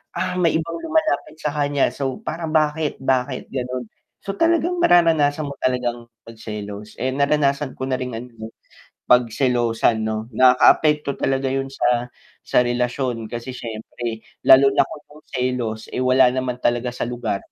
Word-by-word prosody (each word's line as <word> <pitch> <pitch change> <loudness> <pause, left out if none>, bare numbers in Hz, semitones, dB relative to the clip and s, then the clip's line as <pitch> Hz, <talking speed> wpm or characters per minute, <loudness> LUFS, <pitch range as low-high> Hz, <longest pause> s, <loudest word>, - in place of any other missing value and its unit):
"Ah, 180 +1 -2
may 170 -2 +2
ibang 165 +1 -2
lumalapit 320 - 0
sa 150 - -2
kanya 145 -1 +1
so 135 +2 -4
parang 165 -1 -4
bakit, 155 0 +1
bakit?" 130 0 -1
Gano'n, 125 -1 -3 0.4
so 195 - -3
talagang, 340 - +1
mararanasan 160 - +4
mo 140 - -6
talagang 120 -2 -1 0.2
magselos, 105 -2 -8
eh, 130 +2 -1
naranasan 140 0 +1
ko - - -6
na 130 - 0
rin 125 -2 -4
ano, 120 +2 -8 0.2
eh, - - -15 0.6
pagselosan 120 -2 +2
'no, 110 0 -3
nakaapekto 140 +4 +4
talaga 135 0 -1
yun 135 0 -2
sa 120 -2 0 0.3
sa - - +1
relasyon 120 -1 -2
kasi 120 +2 -6
siyempre 115 0 -6 0.2
lalo 135 +1 +7
na - - +5
kung - - -7 0.2
yung 155 - -16
selos 125 -4 -2
eh, 125 - -1
wala 130 0 +5
naman 130 -1 -2
talaga 120 0 0
sa 120 -1 -4
lugar, 120 -4 -3
130 Hz, 155 wpm, -21 LUFS, 120-145 Hz, 0.6 s, lalo